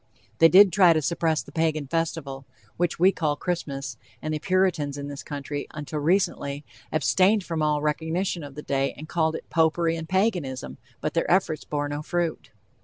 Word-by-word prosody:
They 165 - +8
did 190 0 +7
try 180 -3 +6
to 155 - +1
suppress 160 +1 0
the - - -14
Pagan 160 -3 0
festival, 140 -3 -3 0.3
which 175 -1 0
we 185 +3 +5
call 155 -6 -1
Christmas, 140 -7 -4 0.2
and 155 - -3
the 155 - -2
Puritans 180 -6 +1
in 140 0 -5
this 140 -1 -6
country, 145 0 -5
until 150 0 -4
recently, 145 -4 0 0.3
abstained 190 +6 +3
from 165 -2 -3
all 150 -1 +1
recognition 160 +3 -1
of 140 -1 -9
the 150 - -7
day, 135 0 0
and 155 - -9
called 160 -1 0
it - - -7
"Popery," 165 0 +2
and 160 -1 -6
"Paganism," 180 - -1 0.2
but 155 - -2
their 165 - 0
efforts 170 -4 +1
bore 145 -1 -2
no 145 +1 -4
fruit. 170 +1 -2
160 Hz, 180 wpm, -25 LUFS, 145-175 Hz, 0.3 s, They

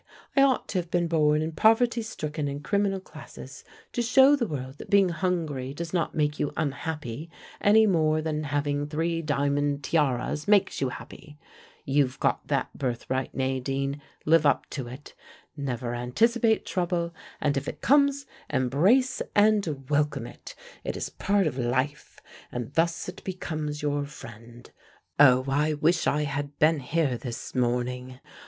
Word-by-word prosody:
"I 275 - +5
ought 270 -2 +3
to 185 - 0
have 175 -1 -5
been 175 -1 +1
born 155 -2 +2
in 160 - -3
poverty 230 +6 +3
stricken 155 -9 -4
and 140 +1 -5
criminal 200 +1 +1
classes 190 - -12 0.3
to 240 - 0
show 265 +4 +6
the 245 -5 -1
world 135 -3 -6
that - - -10
being 200 -2 +5
hungry 160 -7 -2
does 165 +1 -5
not 170 -3 -1
make 150 -1 0
you 145 - 0
unhappy 150 -1 -3 0.3
any 220 +2 +6
more 155 -5 +2
than 155 -1 -2
having 145 0 -1
three 165 +2 -1
diamond 145 -1 0
tiaras 145 0 0
makes 200 -6 +3
you 135 - +1
happy. 150 +3 -11 0.5
You've 135 -2 +1
got - - 0
that - - -1
birthright, 130 0 -3
Nadine, 135 +2 -2 0.2
live 160 0 +5
up 145 -3 +2
to 130 -5 -4
it. 130 +4 -10 0.4
Never 125 -4 -3
anticipate 220 - +2
trouble, 175 -2 -1 0.3
and 145 -1 +1
if 135 - -2
it - - -6
comes 280 0 +3 0.2
embrace 165 - +2
and 200 -10 +2
welcome 145 -3 0
it: - - -11 0.3
it - - -3
is - - -3
part 195 - +1
of 135 -4 -2
life, 130 +4 -2 0.3
and 125 +2 -5
thus 165 +2 0
it 180 - -8
becomes 155 -5 -4
your 145 -1 0
friend. 120 -3 -12 0.5
Oh, 130 -3 +6
I 150 +3 +1
wish 165 +3 +2
I 150 +1 +2
had 145 0 -4
been 155 0 +4
here 140 -2 0
this 120 -3 -6
morning! 125 +1 -1
150 Hz, 155 wpm, -27 LUFS, 135-175 Hz, 0.5 s, show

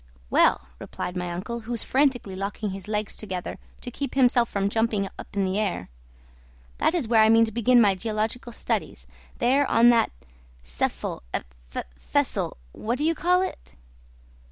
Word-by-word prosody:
"Well," 65 - +3
replied 180 - -5
my 180 -1 -2
uncle, 205 +7 -4
who 230 +1 -8
was 235 - -1
frantically 260 -8 +1
locking 200 +2 -3
his 195 +1 -8
legs 210 -1 -2
together 185 -4 -5 0.2
to 245 - -5
keep 275 +1 -4
himself 245 -3 +4
from 200 -1 0
jumping 220 -1 +1
up - - -7
in 200 -1 +1
the 190 +2 0
air, 185 - -2 0.9
"that 340 - +2
is 310 -10 0
where 225 -1 +5
I 220 - +6
mean 225 0 +6
to 220 - -6
begin 240 +2 +4
my 205 -4 +5
geological 220 +5 -3
studies, - - -3 0.3
there 270 +3 +3
on 235 +1 +6
that 235 - +3 0.5
Seffel - - -3 0.7
Fessel - - -1
what 235 - -3
do 295 - -2
you 325 +2 +3
call 360 +3 +2
it?" 375 - -7
225 Hz, 165 wpm, -25 LUFS, 195-245 Hz, 0.9 s, I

